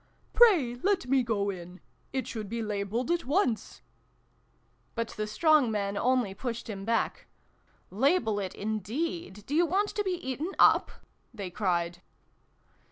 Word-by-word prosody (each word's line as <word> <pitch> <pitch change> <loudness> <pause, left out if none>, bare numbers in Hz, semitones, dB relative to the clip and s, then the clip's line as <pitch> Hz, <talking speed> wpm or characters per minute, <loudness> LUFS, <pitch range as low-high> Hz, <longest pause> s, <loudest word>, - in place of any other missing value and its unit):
" - - -37
Pray 315 - +5
let 395 -7 +1
me 265 +1 +3
go 205 -4 0
in. 180 0 -9 0.3
It 265 -1 -2
should 215 -4 -5
be 230 +1 -3
labeled 210 - -2
at 345 0 0
once! 255 - 0 0.5
" - - -40
But 230 -1 -2
the 215 0 -4
strong 300 +3 +4
men 200 -2 -1
only 245 -3 +1
pushed 235 +3 -5
him 195 -3 -6
back. 230 +1 -1 0.6
"Label 225 - +2
it, 190 -2 -4
indeed! 220 - -3
Do 285 - -5
you 340 +3 +4
want 400 +5 +1
to 415 - -2
be 380 -2 -1
eaten 325 +1 -4
up? - - +5 0.2
" - - -41
they 195 -4 -5
cried. 175 -2 -1
230 Hz, 160 wpm, -29 LUFS, 205-305 Hz, 0.6 s, Pray